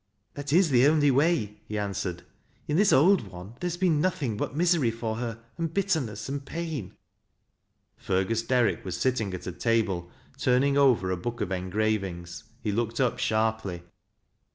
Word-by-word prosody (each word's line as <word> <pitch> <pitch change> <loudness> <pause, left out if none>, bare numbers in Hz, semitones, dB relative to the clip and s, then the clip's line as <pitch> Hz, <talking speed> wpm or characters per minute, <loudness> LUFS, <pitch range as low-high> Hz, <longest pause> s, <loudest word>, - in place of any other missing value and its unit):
" 100 - -47
That 145 0 -5
is 170 0 +4
the 125 +1 +5
only 145 -2 +4
way," 135 -7 +1
he 105 - -4
answered. 95 -4 -3 0.2
" - - -37
In 150 - 0
this 200 +4 +4
old 170 - +5
one 95 +3 -10
there 180 - -2
has 175 0 -3
been 175 -5 +2
nothing 150 - 0
but 120 - -3
misery 170 -6 +3
for 115 -1 -3
her, 115 -1 -5 0.2
and 165 -2 -1
bitterness 155 - -1
and 140 0 -4
pain." 155 - -5 1.0
Fergus 95 +5 0
Derrick 115 -6 +1
was 90 -2 -4
sitting 120 -5 0
at 90 - -8
a 90 - -3
table 95 -4 0 0.3
turning 130 +2 +3
over 125 -10 +4
a 90 - -1
book 120 +7 -5
of 90 - -2
engravings. 95 -3 -2 0.2
He 105 - 0
looked 115 +2 -2
up 125 -3 +1
sharply. 110 -5 -1
115 Hz, 175 wpm, -27 LUFS, 100-145 Hz, 1.0 s, the